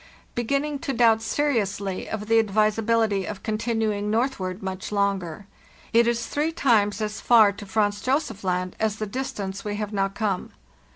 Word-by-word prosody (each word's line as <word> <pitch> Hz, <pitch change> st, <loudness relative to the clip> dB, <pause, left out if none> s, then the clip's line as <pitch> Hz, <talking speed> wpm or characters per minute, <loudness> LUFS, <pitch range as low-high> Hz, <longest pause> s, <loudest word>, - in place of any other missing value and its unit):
Beginning 280 Hz, +5 st, -1 dB
to 285 Hz, -3 st, -3 dB
doubt 225 Hz, -2 st, +4 dB
seriously 215 Hz, -7 st, -1 dB
of 215 Hz, -1 st, -4 dB
the 225 Hz, +1 st, +4 dB
advisability 215 Hz, -1 st, +2 dB
of 205 Hz, -, -6 dB
continuing 215 Hz, -2 st, -1 dB
northward 210 Hz, -5 st, -1 dB
much 190 Hz, +1 st, -5 dB
longer. 200 Hz, -3 st, -1 dB, 0.5 s
it 235 Hz, +1 st, +5 dB
is 235 Hz, 0 st, 0 dB
three 300 Hz, +3 st, -1 dB
times 220 Hz, -, +2 dB
as 210 Hz, 0 st, -3 dB
far 220 Hz, -4 st, +6 dB
to 200 Hz, 0 st, -10 dB
Franz 205 Hz, 0 st, 0 dB
Josef 255 Hz, -5 st, -1 dB
Land 180 Hz, 0 st, -1 dB
as 220 Hz, -2 st, +1 dB
the 215 Hz, -, -3 dB
distance 200 Hz, -4 st, -4 dB
we 210 Hz, -1 st, -3 dB
have 210 Hz, 0 st, -4 dB
now 195 Hz, -1 st, +1 dB
come. 195 Hz, -2 st, -3 dB
215 Hz, 160 wpm, -25 LUFS, 200-230 Hz, 0.5 s, far